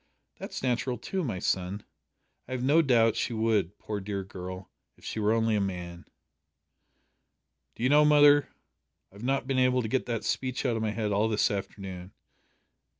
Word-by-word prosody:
'" - - -42
"That's - - -6
natural 125 0 0
too, 190 -1 -3
my 115 - -3
son. 95 +2 -2 0.6
I 130 - -6
have 125 -1 -3
no 145 +5 +5
doubt 115 -6 +3
she - - -2
would, 110 -4 0
poor 105 -1 -5
dear 100 0 -4
girl, 95 -1 -8 0.3
if - - -18
she - - -4
were 105 0 +2
only 115 -1 +2
a 105 - +1
man." 90 -3 -5 1.7
"Do - - -6
you 130 - +3
know, 150 +1 +6
mother, 145 -1 +6 0.6
I've 100 +2 -14
not 135 +3 0
been 135 -1 0
able 130 -1 +3
to - - -2
get 130 +4 -1
that 115 -3 -2
speech 130 +1 -2
out 120 -3 +1
of 110 - -2
my 110 - 0
head 105 -1 -2
all 105 +2 +2
this 105 0 +2
afternoon. 95 -2 -6
110 Hz, 185 wpm, -28 LUFS, 100-130 Hz, 1.7 s, know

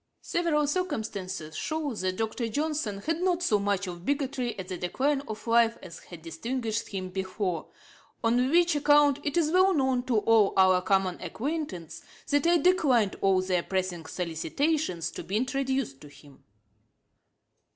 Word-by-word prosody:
Several 325 -4 +1
circumstances 215 - -3
show 310 -3 -2
that 185 -3 -2
Dr. 225 +1 -2
Johnson 285 -6 -2
had 325 - -2
not 360 -1 +1
so 210 -11 +2
much 200 -1 0
of 175 -2 -7
bigotry 265 -2 -2
at 185 -2 -6
the 185 - -4
decline 270 +11 0
of 215 -1 -7
life 230 0 +3
as 175 -3 -10
had 170 -3 -13
distinguished 225 +7 -3
him 185 -2 -5
before, 190 -2 -3 0.6
on 245 +3 +2
which 345 +1 +4
account 290 -1 +4
it 290 +2 -1
is 315 -2 +2
well 370 +1 +4
known 265 -3 +2
to 240 -4 +2
all 215 -1 +3
our 185 -1 +5
common 190 -1 0
acquaintance, 245 - -4 0.3
that 290 +2 +3
I 345 0 +5
declined 280 - +3
all 190 -1 +3
their 185 -2 +1
pressing 180 -3 -3
solicitations 175 - -1
to - - -7
be 190 +5 -2
introduced 265 - -1
to 150 - -11
him.' 145 -1 -17
225 Hz, 155 wpm, -28 LUFS, 185-290 Hz, 0.6 s, our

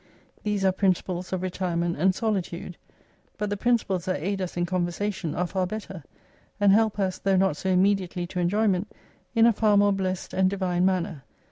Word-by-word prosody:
These 205 -2 -1
are 190 - +5
principles 185 -1 -1
of 185 -1 -2
retirement 175 -2 -1
and 185 +4 +2
solitude; 185 -5 -2 0.6
but 210 -1 -2
the - - +1
principles 195 -5 0
that 185 -6 -1
aid 195 +5 -2
us 180 -1 -4
in 175 - +1
conversation 180 0 -2
are 180 - 0
far 185 +1 -1
better: 190 -4 -7 0.6
and 205 -1 +5
help 220 +1 +3
us, 190 -2 -1
though 195 -1 +2
not 190 -5 +2
so 190 - -3
immediately 185 -1 +1
to 180 +1 -5
enjoyment, 200 +2 +1 0.4
in 230 0 +6
a 235 - +5
far 210 -1 +3
more 205 0 +4
blessed 190 -1 -3
and 190 0 +3
divine 185 -2 0
manner. 180 -5 0
190 Hz, 180 wpm, -26 LUFS, 180-200 Hz, 0.6 s, in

